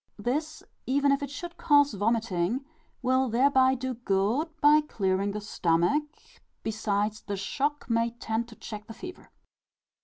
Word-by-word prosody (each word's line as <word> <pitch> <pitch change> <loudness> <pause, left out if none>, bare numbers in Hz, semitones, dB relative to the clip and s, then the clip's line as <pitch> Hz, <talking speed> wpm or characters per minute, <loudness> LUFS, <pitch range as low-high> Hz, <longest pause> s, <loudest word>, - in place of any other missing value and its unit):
This, 300 +8 -2 0.2
even 280 +2 +3
if 275 - +2
it 285 - -3
should 345 +4 -7
cause 290 -3 +4
vomiting, 220 +2 0 0.4
will 260 0 +2
thereby 260 +2 +4
do 260 0 -3
good 225 - 0
by 300 +1 +6
clearing 195 -8 -1
the 205 +1 -3
stomach; 200 - +1 0.5
besides, 215 -1 -1
the 200 -1 -4
shock 285 +9 -2
may 230 0 +2
tend 230 0 -3
to 230 - -13
check 210 -1 -8
the 225 - -9
fever. 365 0 -10
235 Hz, 145 wpm, -28 LUFS, 210-285 Hz, 0.5 s, by